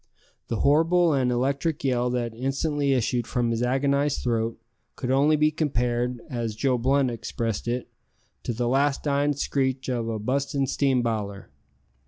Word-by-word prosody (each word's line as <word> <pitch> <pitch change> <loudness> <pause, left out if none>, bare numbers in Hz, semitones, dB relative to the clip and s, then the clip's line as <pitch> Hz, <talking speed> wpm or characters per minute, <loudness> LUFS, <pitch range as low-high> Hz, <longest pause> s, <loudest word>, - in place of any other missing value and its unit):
The 115 - -2
horrible 165 +3 +4
and 130 -3 +1
electric 140 +5 -1
yell 125 -2 +1
that 120 -2 -2
instantly 140 +3 0
issued 120 -1 0
from 120 -1 0
his 115 0 -1
agonized 140 +3 +1
throat 115 -2 -1 0.4
could 125 - -3
only 145 +3 +4
be 150 0 +3
compared, 125 -5 -1
as 120 -6 -3
Joe 130 +1 +1
Blunt 135 +1 +2
expressed 115 -1 -3
it, 120 +1 -2 0.5
"to - - -3
the 120 +1 -1
last 140 +3 +1
dyin' 145 0 +1
screech 130 -1 -1
o' 115 -2 -2
a 110 - -2
bustin' 135 +5 -1
steam 135 -2 +1
biler!" 105 -4 -3
130 Hz, 155 wpm, -25 LUFS, 120-140 Hz, 0.5 s, horrible